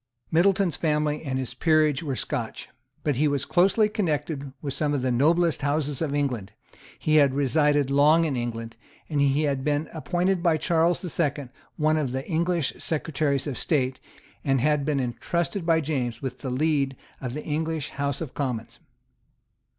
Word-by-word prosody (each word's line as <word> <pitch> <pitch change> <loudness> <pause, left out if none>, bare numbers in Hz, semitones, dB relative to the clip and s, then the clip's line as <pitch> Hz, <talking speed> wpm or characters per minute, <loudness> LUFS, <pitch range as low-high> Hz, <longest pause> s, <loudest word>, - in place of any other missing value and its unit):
Middleton's 185 0 +3
family 150 -1 0
and 135 -3 -2
his 130 -2 -3
peerage 155 0 +2
were 140 -5 -3
Scotch. 115 -2 -4 0.3
But 145 -5 0
he 150 +3 +3
was 140 -1 0
closely 195 +4 +3
connected 150 -8 -2
with 140 -2 -4
some 145 -1 0
of 130 - -1
the 130 - +1
noblest 160 +5 +2
houses 145 0 -1
of 145 -3 -1
England; 125 -9 -2 0.4
he 155 0 +2
had 140 -3 +4
resided 145 0 +2
long 150 +4 +5
in 145 -4 -1
England; 115 -1 -4 0.3
he 140 -1 +1
had 140 -3 0
been 150 +1 0
appointed 175 +3 0
by 170 -3 +3
Charles 170 +2 +1
the 180 - -3
Second 145 -5 -1 0.3
one 155 0 +2
of 140 -5 -1
the 135 +1 -4
English 170 -3 0
Secretaries 150 -3 -1
of 145 -4 -3
State, 130 -4 0 0.4
and 135 -2 +2
had 150 +2 +2
been 145 -2 +1
entrusted 165 - -2
by 165 -1 +4
James 130 -6 -2
with 130 - -5
the 135 - -4
lead 140 0 +1 0.3
of 125 -1 -4
the 150 - -5
English 160 -1 -2
House 140 0 -2
of 155 -6 -5
Commons. 125 -5 -4
145 Hz, 170 wpm, -25 LUFS, 135-160 Hz, 0.4 s, long